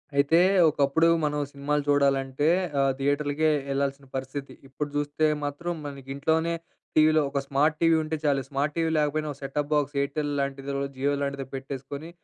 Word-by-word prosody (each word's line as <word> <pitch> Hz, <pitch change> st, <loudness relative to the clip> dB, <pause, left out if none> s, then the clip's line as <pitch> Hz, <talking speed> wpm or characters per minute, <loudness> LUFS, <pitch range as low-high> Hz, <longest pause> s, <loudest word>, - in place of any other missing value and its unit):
అయితే 140 Hz, +3 st, +4 dB, 0.3 s
ఒకప్పుడు 145 Hz, +2 st, +2 dB, 0.2 s
మనం 150 Hz, 0 st, 0 dB
సినిమాలు 145 Hz, +1 st, -1 dB
చూడాలంటే 140 Hz, 0 st, +2 dB, 0.3 s
ఆహ్, 135 Hz, 0 st, +3 dB
థియేటర్‌లకే 145 Hz, +2 st, +1 dB, 0.2 s
వెళ్ళాల్సిన 140 Hz, 0 st, -1 dB
పరిస్థితి. 135 Hz, +1 st, -5 dB
ఇప్పుడు 145 Hz, +2 st, -4 dB
చూస్తే 145 Hz, +1 st, 0 dB, 0.2 s
మాత్రం 145 Hz, +5 st, -3 dB
మనకింట్లోనే 145 Hz, +4 st, -1 dB, 0.4 s
టీవీలో 155 Hz, 0 st, +5 dB
ఒక 140 Hz, -, -1 dB
స్మార్ట్‌టీవీ 155 Hz, +4 st, +3 dB
ఉంటే 155 Hz, +1 st, -2 dB
చాలు. 140 Hz, -2 st, +2 dB
స్మార్ట్‌టీవీ 150 Hz, +4 st, 0 dB
లేకపోయినా, 155 Hz, +1 st, 0 dB
ఒక 140 Hz, -, -9 dB
సెటాప్ 145 Hz, +2 st, -3 dB
బాక్స్ 145 Hz, -1 st, 0 dB
ఎయిర్టెల్ 145 Hz, +1 st, -2 dB
లాంటిది, 140 Hz, 0 st, -3 dB, 0.2 s
జియో 140 Hz, +2 st, 0 dB
లాంటిదో 140 Hz, -1 st, -2 dB
పెట్టేసుకొని 135 Hz, +3 st, -6 dB
145 Hz, 135 wpm, -26 LUFS, 140-150 Hz, 0.4 s, టీవీలో